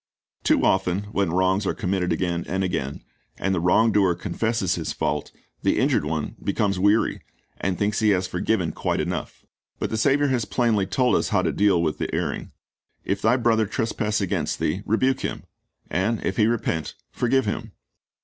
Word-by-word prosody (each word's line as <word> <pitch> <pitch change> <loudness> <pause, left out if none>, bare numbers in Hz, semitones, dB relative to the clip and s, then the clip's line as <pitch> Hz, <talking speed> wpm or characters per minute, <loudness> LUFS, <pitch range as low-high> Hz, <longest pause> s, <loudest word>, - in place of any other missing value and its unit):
Too - - +3
often 95 0 +1
when 100 -4 +1
wrongs 95 +3 +2
are - - 0
committed 90 -2 -1
again 85 0 -1
and 95 +1 -1
again, 70 -7 -3 0.3
and 95 - 0
the 90 - +1
wrong 110 +6 +4
doer 95 -4 +3
con 90 +1 -6
fesses 110 -5 0
his 80 - -3
fault, 75 0 -2 0.3
the - - +2
injured - - +2
one 75 -1 -3
becomes 100 -2 0
weary, 105 +4 +2 0.4
and 90 -1 -1
thinks 105 +1 0
he 110 -1 +3
has 95 -2 +2
forgiven 90 -1 0
quite - - -2
enough. - - -4 0.3
But - - -3
the 110 - -1
Saviour 140 +5 +3
has 125 -4 0
plainly 110 -6 +1
told 125 +6 +2
us - - +1
how - - +2
to - - +1
deal 100 -4 +3
with 80 -2 -1
the - - -2
erring: - - -3 0.5
"If 100 +1 -1
thy 115 +4 +4
brother 115 -3 +2
trespass 110 -1 -1
against 95 - -1
thee, 85 +6 -1
rebuke 130 +4 +2
him; - - -4 0.4
and 100 +5 0
if 95 - -1
he 110 - +4
repent, 105 -9 -1 0.2
forgive 130 +1 +1
him."' 105 - -3
100 Hz, 185 wpm, -24 LUFS, 90-110 Hz, 0.5 s, wrong